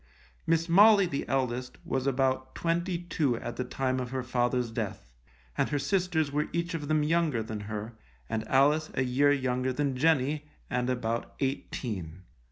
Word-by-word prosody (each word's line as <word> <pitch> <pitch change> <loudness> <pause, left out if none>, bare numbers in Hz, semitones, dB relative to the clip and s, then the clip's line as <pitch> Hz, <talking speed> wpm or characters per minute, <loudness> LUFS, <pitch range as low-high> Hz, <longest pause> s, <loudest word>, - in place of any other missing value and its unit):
Miss 165 +1 +2
Molly, 200 +3 +7
the 140 -5 -3
eldest, 130 -1 -1
was 135 0 -1
about 130 -1 0
twenty 170 +2 0
two 160 -7 0
at 120 0 -5
the 125 - -2
time 130 +1 -1
of 125 -1 -4
her 130 0 -3
father's 125 -1 0
death, - - -5 0.4
and - - +1
her 145 - 0
sisters 170 -2 0
were 150 +1 0
each 170 +2 -2
of 150 -3 -4
them 155 0 +2
younger 155 -6 +1
than 110 -1 -5
her, 110 +2 -5 0.3
and 110 - -3
Alice 150 +4 +3
a 130 - +2
year 135 +3 +3
younger 130 -2 0
than 140 0 -1
Jenny, 150 +1 +2 0.2
and 125 0 0
about 120 -2 -2
eighteen. 100 - -3
135 Hz, 170 wpm, -29 LUFS, 125-155 Hz, 0.4 s, Molly